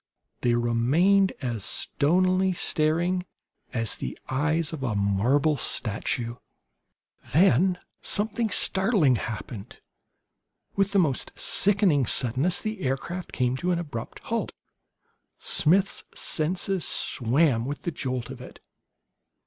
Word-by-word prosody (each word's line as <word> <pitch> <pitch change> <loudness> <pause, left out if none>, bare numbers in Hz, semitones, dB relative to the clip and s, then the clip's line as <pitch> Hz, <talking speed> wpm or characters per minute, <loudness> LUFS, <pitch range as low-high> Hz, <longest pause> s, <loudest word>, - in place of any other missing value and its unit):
They 120 -1 +2
remained 145 +12 +2
as 115 -5 -3
stonily 185 - +1
staring 170 +3 0 0.5
as 115 -3 +1
the 65 - -6
eyes 155 +4 0
of 155 - -6
a 120 -5 -2
marble 120 +10 +1
statue. 115 +2 -2 0.9
Then 180 +2 +4 0.2
something 220 +2 0
startling 190 - +3
happened. 110 -2 -7 1.0
With 195 0 +1
the - - +3
most 155 -9 0
sickening 190 - +3
suddenness 135 - +2
the 215 -2 -4
aircraft 170 +6 -3
came 125 -1 0
to 175 +6 -2
an 175 - +1
abrupt 145 -9 -6
halt. - - -2 0.9
Smith's 190 +5 +1
senses 180 +3 0
swam 125 -1 +1
with 145 +2 -5
the 170 - -2
jolt 130 -5 -4
of - - -9
it. - - -12
155 Hz, 110 wpm, -26 LUFS, 125-185 Hz, 1.0 s, Then